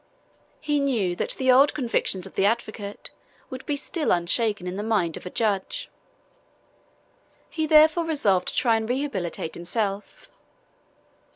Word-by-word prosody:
He 295 -1 0
knew 230 -11 0
that - - -2
the 260 -1 +2
old 275 +3 +5
convictions 230 -8 -1
of 195 - -11
the - - 0
advocate 210 -1 -2 0.4
would 260 0 -7
be 290 - 0
still 305 +2 -2
unshaken 190 +3 +1
in 180 +1 -4
the 200 - -3
mind 210 -7 0
of - - -8
the 180 - -7
judge. 215 - -2 1.6
He 315 -1 -2
therefore 315 +2 +5
resolved 205 - +1
to - - -3
try 230 -3 +3
and 220 0 -4
rehabilitate 205 - -3
himself. 200 +3 -4
225 Hz, 145 wpm, -25 LUFS, 195-280 Hz, 1.6 s, old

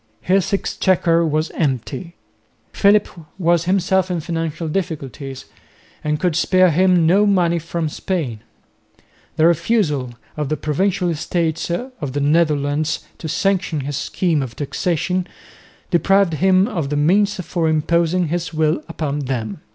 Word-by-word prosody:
His 190 0 +1
exchequer 180 -4 +2
was 155 0 0
empty. 145 +4 -3 0.6
Philip 205 +1 +4 0.3
was 170 -2 +2
himself 190 0 +1
in 180 -2 -1
financial 165 0 -3
difficulties 145 -6 -4 0.6
and 150 0 -1
could 180 -4 0
spare 185 +1 +4
him 180 0 +3
no 195 +5 +4
money 175 -4 +2
from 165 0 -3
Spain. 150 - -3 1.0
The 160 - +3
refusal 155 - +1 0.2
of 150 -2 -3
the 155 - -1
provincial 180 +6 0
estates 165 0 -1
of 175 - -4
the 145 - -1
Netherlands 150 0 +1
to 160 - -5
sanction 185 -2 0
his 140 +1 -4
scheme 165 +1 0
of 125 -3 -6
taxation 180 +4 -1 0.6
deprived 195 0 +3
him 185 +4 +3
of 165 - -3
the 145 - -1
means 200 +7 +3
for 170 -2 -1
imposing 170 +2 +1
his 170 +1 -2
will 155 -1 0
upon 150 -3 -3
them. 115 -6 -4
165 Hz, 135 wpm, -20 LUFS, 150-185 Hz, 1.0 s, Philip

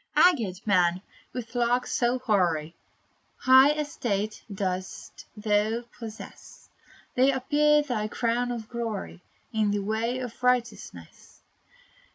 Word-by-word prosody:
Aged 205 - -5
man, 180 -2 +2 0.3
with 235 -2 -7
locks 245 0 +1
so 240 +1 +1
hoary, 175 -9 0 0.6
High 265 +3 +6
estate 225 -9 -3
dost 185 -1 -5
thou 215 +2 +1 0.2
possess! 225 -1 -11 0.4
They 260 +2 +4
appear 295 +3 +3
thy 230 -7 -2
crown 240 +2 -1
of 230 -3 -5
glory, 225 -6 -5 0.3
In 215 -2 +1
the 205 -1 -1
way 225 +4 -1
of 250 -2 -7
righteousness. 250 -1 -2
230 Hz, 110 wpm, -27 LUFS, 205-250 Hz, 0.6 s, High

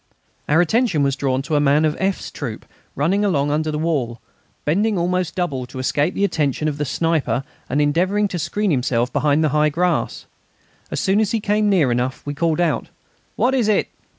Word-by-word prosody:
Our 160 +3 +5
attention 190 - +2
was 140 -1 +1
drawn 135 -1 -1
to 150 +2 -2
a - - +4
man 145 +2 +3
of 155 0 0
F.'s 195 0 -1
troop - - -6 0.3
running 180 +9 +1
along 145 -8 +1
under 155 +1 0
the 150 - -2
wall, 140 -8 -1 0.5
bending 200 +7 +1
almost 180 0 -1
double 140 -9 -2
to 130 - -10
escape 145 +5 0
the 200 - 0
attention 155 -5 0
of 145 -1 -3
the 150 - 0
sniper, 160 -3 0 0.3
and 140 - 0
endeavouring 180 +8 +2
to 180 - -3
screen 195 +5 -1
himself 125 -3 0
behind 145 +2 +2
the 155 - +2
high 150 +1 +3
grass. 175 +3 -1 0.6
As - - -3
soon 195 +2 +2
as 215 -1 +1
he 225 - +1
came 210 0 +1
near 165 -10 +3
enough 125 +2 -2
we 145 - -3
called 160 +1 0
out: 170 -2 0 0.5
"What 255 +2 +2
is 250 -5 +2
it?" 215 - +2
155 Hz, 200 wpm, -20 LUFS, 145-190 Hz, 0.6 s, Our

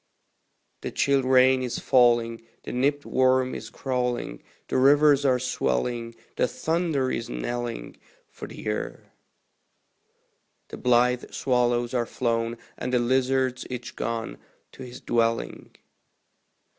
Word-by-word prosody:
The - - -4
chill 140 -1 +2
rain 130 0 +4
is 125 -2 -3
falling, 120 -3 +3 0.2
the - - -6
nipped 140 +3 0
worm 130 0 +2
is 115 - -7
crawling, 125 - -3 0.3
The - - -1
rivers 145 +1 +5
are 130 -2 +4
swelling, 115 - -2 0.2
the - - +2
thunder 160 -2 -1
is 115 - -3
knelling 120 - -4 0.3
For - - -9
the - - -12
Year; 105 -1 -5 1.6
The - - -8
blithe 125 0 +2
swallows 120 -1 0
are 120 -2 0
flown, 115 -1 -1 0.2
and 125 - -3
the 125 - +3
lizards 130 +1 +1
each 125 -1 -6
gone 115 -1 -4 0.3
To - - -13
his 125 0 -9
dwelling. 115 -1 -1
125 Hz, 120 wpm, -25 LUFS, 120-130 Hz, 1.6 s, rivers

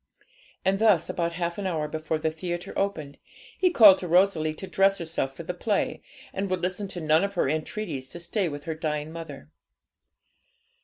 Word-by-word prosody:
And 195 +1 +2
thus, 205 -7 +4
about 170 -1 -1
half 170 +1 -3
an 195 - -2
hour 160 -4 -1
before 155 +1 -2
the 155 0 -1
theatre 175 +2 -5
opened, 155 -8 -2 0.4
he 370 - +3
called 210 - +8
to 180 - -5
Rosalie 170 -3 +3
to 190 - -7
dress 195 +1 +3
herself 160 -5 -3
for 170 - -7
the 180 - -4
play, 200 +3 -1 0.3
and 195 0 -2
would 185 -1 -1
listen 185 +3 -2
to 185 -2 -6
none 155 +2 +3
of 200 0 -2
her 175 - +2
entreaties 155 -2 -3
to 170 - -8
stay 175 +2 -1
with 145 -1 -7
her 160 - -3
dying 155 -1 -3
mother. 155 -3 -9
170 Hz, 190 wpm, -26 LUFS, 155-195 Hz, 0.4 s, called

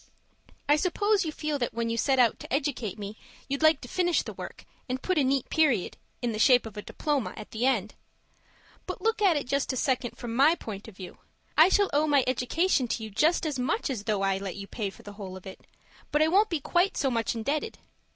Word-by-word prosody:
I 295 +1 +5
suppose 390 +4 +1
you 315 - -2
feel 300 -1 -3
that 240 - -2
when 230 0 -1
you - - -1
set 265 +4 +2
out 240 -3 +3
to - - -10
educate 260 -7 -1
me, 205 +1 -7 0.3
you'd 280 +1 -2
like 315 -2 +5
to - - -9
finish 350 +5 +1
the - - -7
work, - - -9 0.2
and 255 +1 -1
put 370 +3 0
a - - +3
neat 265 -1 +1
period, 280 - +2 0.3
in 240 - 0
the 215 - -4
shape 245 +2 +5
of 220 -2 -9
a 210 - -5
diploma, 290 +1 -2
at 215 - -9
the 235 +4 0
end. 215 -6 0 0.9
But - - -6
look 450 -1 +1
at 370 -6 +4
it 285 - -3
just 275 +2 0
a - - -3
second 250 -2 -1
from 235 -2 -5
my 290 +6 +5
point 210 - -8
of 210 -4 -13
view. 185 -2 -10 0.4
I 320 +4 +7
shall 400 0 +3
owe 300 +2 +3
my 285 -3 +4
education 255 +3 +1
to 225 - -3
you 220 - -7
just 315 - +2
as 295 -4 -2
much 285 - -1
as 215 -5 -5
though 210 -3 0
I 195 0 +1
let 195 -2 -5
you 200 - -7
pay 205 0 -4
for - - -15
the 205 - -9
whole 195 -3 -8
of 185 - -14
it, 190 - -11 0.4
but 300 +1 +3
I 315 - +3
won't 410 +5 +4
be 335 -3 -1
quite 350 +7 +1
so 270 -3 +1
much 230 -1 -1
indebted. 280 +7 -2
260 Hz, 240 wpm, -28 LUFS, 220-310 Hz, 0.9 s, I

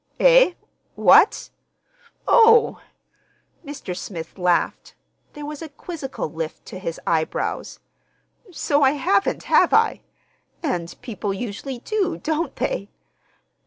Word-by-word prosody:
"Eh? - - +6 0.4
What? - - +5 0.8
Oh!" 455 -1 +5 0.8
Mr. 285 - -7
Smith 175 -1 -8
laughed. 180 -1 0 0.4
There 295 0 -8
was 300 0 -7
a 325 - -7
quizzical 290 - -6
lift 160 0 -6
to 185 - -8
his 165 -4 -5
eyebrows. 160 -1 -2 0.7
"So 295 -3 0
I 270 0 +5
haven't, 360 +7 0
have - - +4
I? 450 +1 +2 0.6
And 175 - -3
people 210 -4 -4
usually 245 +5 -5
do, 400 - -2
don't 315 -2 -2
they? 200 - -3
275 Hz, 110 wpm, -22 LUFS, -, 0.8 s, Eh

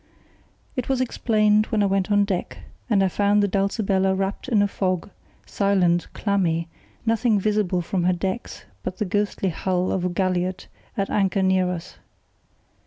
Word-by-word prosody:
It 255 -2 -3
was 265 -1 +1
explained 215 -4 +2
when 215 -2 +1
I - - +3
went 195 +1 0
on 205 0 +4
deck, 190 -3 -3 0.3
and 200 -4 +3
I - - +3
found 205 +2 +2
the - - +3
Dulcibella 195 -1 +1
wrapped 195 +4 -3
in 220 -5 +3
a - - +2
fog, 185 -1 -2 0.3
silent, 185 -4 +1
clammy, 175 -5 0 0.4
nothing 225 -1 +2
visible 200 -3 0
from 175 0 -1
her 180 - +3
decks 190 +6 -4 0.2
but 185 0 -5
the 210 - -1
ghostly 200 0 -1
hull 180 +1 -1
of 185 - -1
a 180 - +1
galliot 185 0 -1 0.3
at 195 -1 -1
anchor 195 -1 +1
near 185 -1 +2
us. 175 -2 -6
195 Hz, 165 wpm, -23 LUFS, 185-210 Hz, 0.4 s, on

